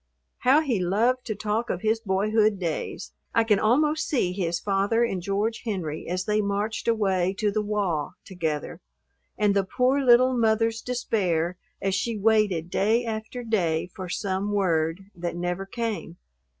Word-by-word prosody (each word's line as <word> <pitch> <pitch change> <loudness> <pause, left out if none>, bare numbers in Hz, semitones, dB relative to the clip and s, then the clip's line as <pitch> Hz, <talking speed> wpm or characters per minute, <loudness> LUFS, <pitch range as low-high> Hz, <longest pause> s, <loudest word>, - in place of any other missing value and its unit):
How 270 +5 +5
he 255 -10 0
loved 225 +8 +1
to 215 - -2
talk 215 +3 -2
of 180 - -2
his 220 +1 +1
boyhood 210 +1 +2
days! 170 -4 -4 0.2
I 230 - +5
can 210 -3 +3
almost 300 +8 +2
see 235 -11 +1
his 175 -3 -1
father 200 +4 +1
and 195 -6 -1
George 205 +5 -1
Henry 175 -9 -4
as 185 +1 -2
they 210 0 +1
marched 205 +3 -2
away 195 -5 +1
to 210 -2 +1
the 215 +1 0
"wah" 195 -6 -1
together, 160 -5 -4 0.6
and 205 -1 +2
the 200 - +3
poor 255 +8 +1
little 255 +1 +5
mother's 225 -1 +2
despair 180 -9 -1 0.2
as 195 -1 -1
she 220 +4 -1
waited 205 -5 +2
day 225 +4 +2
after 225 +2 -5
day 180 -7 0
for 185 -2 -6
some 195 +2 -2
word, 180 -1 0
that 175 0 -4
never 175 +2 -3
came. 210 -7 -4
205 Hz, 160 wpm, -25 LUFS, 185-225 Hz, 0.6 s, How